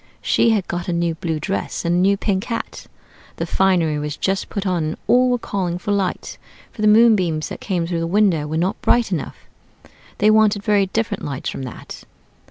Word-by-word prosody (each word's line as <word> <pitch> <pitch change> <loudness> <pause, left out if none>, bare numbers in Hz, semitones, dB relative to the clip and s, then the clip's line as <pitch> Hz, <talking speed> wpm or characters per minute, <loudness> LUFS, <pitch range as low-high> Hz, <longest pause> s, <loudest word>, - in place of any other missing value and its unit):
She - - +3
had 210 -5 +1
got 175 0 -4
a 175 - -1
new 170 -1 0
blue 160 -1 -3
dress, 190 +2 -3
and 170 - +1
a - - +2
new 200 +2 +3
pink 195 -1 -1
hat. 230 -1 -5 0.5
The - - -3
finery 175 -6 +1
was 150 0 -4
just 195 0 -1
put 200 -1 -4
on, 180 -4 0
and 155 0 -3
all 250 +1 +4
were 245 - +2
calling 185 -6 -3
for 190 +3 -4
light, 195 -2 -2 0.3
for 215 - -9
the 215 - +3
moonbeams 210 -8 +4
that - - -8
came 180 -4 -1
through 170 0 -2
the 165 - -2
window 180 -5 +2
were 155 +1 -2
not 180 +4 -1
bright 240 -4 +2
enough. 170 -6 -3 0.8
They 210 +1 +4
wanted 215 -2 +3
very 205 -2 +2
different 220 +1 -2
lights 140 -2 -4
from - - -6
that. - - -11
190 Hz, 205 wpm, -20 LUFS, 170-210 Hz, 0.8 s, all